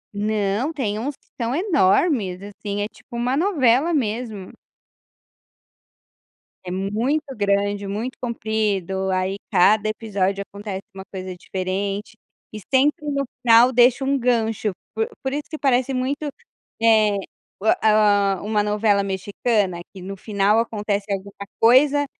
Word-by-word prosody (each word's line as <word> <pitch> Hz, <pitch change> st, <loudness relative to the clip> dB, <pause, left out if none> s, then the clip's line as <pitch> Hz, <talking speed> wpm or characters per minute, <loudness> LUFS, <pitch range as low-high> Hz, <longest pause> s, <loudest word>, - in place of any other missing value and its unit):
Não, 210 Hz, +5 st, 0 dB
tem 220 Hz, -9 st, -2 dB
uns 280 Hz, +4 st, -3 dB
que -, -, -37 dB, 0.2 s
são 235 Hz, +3 st, 0 dB
enormes. 220 Hz, -, +2 dB
Assim, 205 Hz, 0 st, -5 dB
é 205 Hz, -, -2 dB
tipo 220 Hz, +2 st, -14 dB
uma 245 Hz, +2 st, 0 dB
novela 300 Hz, -, +3 dB
mesmo. 220 Hz, -6 st, -3 dB, 2.1 s
É 180 Hz, -, -5 dB
muito 220 Hz, +11 st, -1 dB
grande, 205 Hz, -1 st, 0 dB
muito 230 Hz, +5 st, -4 dB
comprido, 210 Hz, -5 st, -1 dB
aí 185 Hz, +1 st, 0 dB, 0.2 s
cada 210 Hz, +4 st, +4 dB
episódio 200 Hz, -3 st, -1 dB
acontece 200 Hz, -1 st, -6 dB
uma 190 Hz, -, -7 dB
coisa 185 Hz, -1 st, -6 dB
diferente. 195 Hz, +3 st, -3 dB, 0.4 s
E 215 Hz, -, -6 dB
sempre 295 Hz, +4 st, +3 dB
no 280 Hz, -1 st, -1 dB, 0.2 s
final 240 Hz, +2 st, +6 dB
deixa 245 Hz, +2 st, +4 dB
um 275 Hz, +1 st, +2 dB
gancho, 225 Hz, -4 st, 0 dB, 0.2 s
por 450 Hz, +1 st, -1 dB
por 265 Hz, 0 st, -3 dB
isso 295 Hz, +1 st, -2 dB
que 310 Hz, -, -5 dB
parece 265 Hz, -2 st, +1 dB
muito, 260 Hz, +4 st, -2 dB, 0.6 s
eh, 215 Hz, -2 st, +4 dB, 0.5 s
u -, -, -6 dB, 0.2 s
a 205 Hz, -2 st, +4 dB
a -, -, -9 dB
uma 210 Hz, 0 st, 0 dB
novela 210 Hz, -1 st, +2 dB
mexicana, 195 Hz, -1 st, -1 dB
que 190 Hz, -, -10 dB
no 195 Hz, +2 st, -6 dB
final 200 Hz, +1 st, +1 dB
acontece 210 Hz, -3 st, -2 dB
alguma 200 Hz, +1 st, -5 dB
coisa, 280 Hz, +5 st, +5 dB
215 Hz, 135 wpm, -22 LUFS, 200-250 Hz, 2.1 s, final